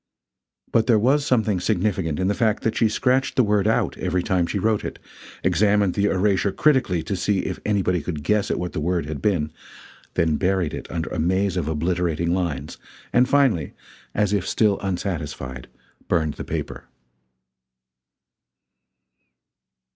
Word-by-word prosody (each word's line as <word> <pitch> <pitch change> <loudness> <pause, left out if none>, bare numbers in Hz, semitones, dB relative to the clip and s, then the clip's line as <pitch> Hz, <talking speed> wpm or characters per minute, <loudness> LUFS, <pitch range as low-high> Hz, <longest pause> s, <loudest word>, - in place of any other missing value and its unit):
But 115 -1 +2
there 115 -3 +5
was 135 +7 +3
something 110 -6 +2
significant 90 -5 0
in 95 - +1
the 100 - +2
fact 110 0 0
that 115 - 0
she 115 - +3
scratched 130 +4 +1
the 130 - +4
word 105 -1 +2
out 110 - +1
every 90 0 0
time 90 -4 +1
she 100 - -2
wrote 105 +1 +1
it; - - -5 0.5
examined 100 +1 +3
the 100 - +1
erasure 100 0 +2
critically 125 - +2
to 100 - -3
see 95 +1 0
if - - -4
anybody 95 -4 +1
could 75 -2 -5
guess 105 +2 +1
at - - 0
what 90 0 -4
the - - -2
word 85 +1 0
had 75 -2 -5
been; 80 -7 0 0.6
then 80 -2 +2
buried 90 -3 0
it - - -7
under 80 -2 -4
a - - -3
maze 95 +4 +1
of 85 -5 -1
obliterating 85 +1 0
lines; 80 -6 -3 0.3
and 125 +1 +4
finally, 130 - +2 0.4
as 105 -1 +1
if 100 -3 0
still 105 -3 +2
unsatisfied, 80 -9 -4 0.4
burned 80 -4 +1
the - - -7
paper. - - -5
95 Hz, 160 wpm, -23 LUFS, 85-105 Hz, 0.6 s, there